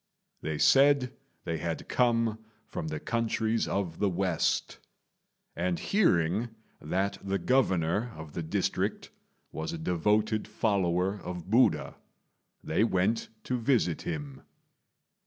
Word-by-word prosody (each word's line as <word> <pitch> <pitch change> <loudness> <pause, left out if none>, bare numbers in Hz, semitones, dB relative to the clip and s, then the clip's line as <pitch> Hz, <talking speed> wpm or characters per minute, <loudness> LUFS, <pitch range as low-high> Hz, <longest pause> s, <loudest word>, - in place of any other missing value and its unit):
They 75 -1 -3
said 135 - +4 0.3
they 80 -1 -3
had 80 +1 -4
come 115 -3 +2 0.3
from 80 - -5
the 75 0 -3
countries 115 +1 0
of 90 -5 -2
the 100 - +2
west; 90 -2 0 0.8
and 90 0 0
hearing 105 - +2 0.3
that 95 +6 -1
the 100 0 0
Governor 105 -3 +1
of 80 -2 -9
the - - -3
district 80 - -1 0.4
was 80 0 -4
a - - -3
devoted 105 +6 +1
follower 95 -2 0
of 90 0 -7
Buddha, 125 +3 +3 0.7
they 80 +7 +1
went 110 +2 +1
to 125 -1 -1
visit 115 - +1
him. 75 -4 -5
95 Hz, 120 wpm, -29 LUFS, 85-115 Hz, 0.8 s, said